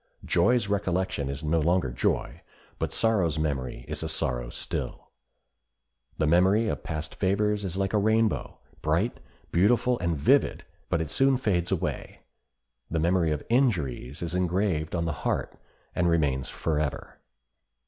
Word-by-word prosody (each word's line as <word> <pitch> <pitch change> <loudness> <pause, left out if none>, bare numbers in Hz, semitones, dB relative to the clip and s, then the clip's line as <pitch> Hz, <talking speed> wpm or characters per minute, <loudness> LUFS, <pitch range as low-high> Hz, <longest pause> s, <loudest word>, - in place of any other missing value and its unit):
Joy's 120 -3 +3
recollection 95 -7 -1
is 70 +2 -5
no 80 +2 +2
longer 85 -4 +2
joy, - - -1 0.4
but - - -1
sorrow's 95 -9 +2
memory 70 -5 -2
is - - -4
a - - -3
sorrow - - -1
still. - - -5 1.1
The - - +1
memory 95 +8 +4
of 75 - -3
past 75 -1 -5
favors 105 +2 +1
is 95 -1 -3
like 95 0 -1
a 105 - +4
rainbow—bright, 110 -3 0 0.3
beautiful, 120 +7 +3
and 85 -3 0
vivid—but 75 +3 +1
it 80 -1 -4
soon 135 -1 +3
fades 90 -8 0
away; 95 - -3 0.7
the 80 - -1
memory 85 +1 +2
of 75 -1 -2
injuries 80 - 0
is 85 0 -3
engraved 90 -3 0
on 85 -1 0
the 80 - -1
heart, - - -1 0.4
and 90 -1 +2
remains 70 -6 +1
forever. 75 -3 -2
85 Hz, 140 wpm, -27 LUFS, 75-100 Hz, 1.1 s, memory